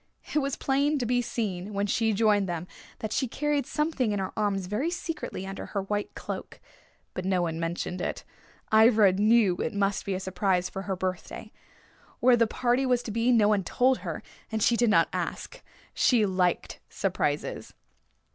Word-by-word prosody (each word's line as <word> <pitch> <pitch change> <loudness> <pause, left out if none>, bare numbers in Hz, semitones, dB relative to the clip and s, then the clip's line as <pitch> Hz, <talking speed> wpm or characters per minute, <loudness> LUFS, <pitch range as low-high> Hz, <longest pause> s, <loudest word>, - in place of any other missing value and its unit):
It 300 - +3
was 275 -2 -1
plain 280 +2 +1
to 250 - -1
be 245 +1 +2
seen, 205 -4 -3
when 200 +1 +1
she 220 +2 +1
joined 205 -2 +2
them, 170 0 -3 0.4
that 220 - -3
she 265 - 0
carried 295 +3 -1
something 300 -7 0
in 205 - -1
her 190 -1 -3
arms 200 -3 0
very 210 - -1
secretly 330 - -5
under 195 0 -6
her 200 -2 -3
white 205 +1 -3
cloak. - - -6 0.5
But 185 - -4
no 185 -1 +1
one 165 -1 -2
mentioned 170 +2 -3
it. - - -3 0.5
Ivra 220 -2 +6
knew 205 -1 +3
it 230 - -3
must 200 0 0
be 195 - -2
a - - -2
surprise 185 -1 0
for 195 - -5
her 190 - 0
birthday. 185 0 -5 0.7
Where 250 0 +6
the 230 -1 +3
party 245 +3 +1
was 250 -2 +1
to 225 - -5
be 230 +3 +2
no 215 -4 +5
one 205 -2 +2
told 255 +7 +2
her, - - -5 0.3
and 220 -1 0
she 240 - +4
did 235 0 +3
not 215 - +4
ask. - - -4 0.3
She 235 -5 +3
liked 185 -2 0
surprises. - - -2
210 Hz, 185 wpm, -27 LUFS, 190-245 Hz, 0.7 s, Ivra